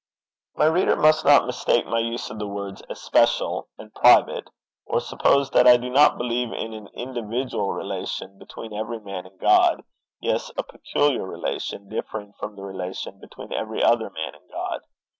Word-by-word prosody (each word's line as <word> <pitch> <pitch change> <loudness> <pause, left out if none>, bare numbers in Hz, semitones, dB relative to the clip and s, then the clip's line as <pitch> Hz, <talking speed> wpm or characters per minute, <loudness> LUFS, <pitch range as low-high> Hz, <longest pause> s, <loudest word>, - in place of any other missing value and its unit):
My - - +3
reader 160 +4 +3
must 155 +1 +4
not 145 -3 +7
mistake 120 -1 +1
my 115 - 0
use 115 +1 -3
of 105 - -7
the 105 - -3
words 100 -1 -6
especial - - +1
and - - -13
private, - - +5 0.4
or - - +1
suppose 140 -1 +2
that 125 - +5
I 125 0 +9
do 125 +1 -5
not 145 +3 +5
believe 120 0 -1
in 110 - -5
an 110 -2 -9
individual 120 -3 -3
relation 95 0 -5
between 110 -1 -10
every 110 +2 -4
man 100 -3 -7
and 95 0 -23
God, - - +4 0.4
yes, - - -1
a - - 0
peculiar 145 -3 0
relation, 100 +1 -4
differing 105 -1 -6
from 105 0 -7
the 100 - -10
relation 95 -1 -6
between - - -10
every 110 0 -2
other 115 -3 +3
man 80 -4 -5
and 75 - -21
God! - - -4
110 Hz, 170 wpm, -24 LUFS, 100-125 Hz, 0.4 s, I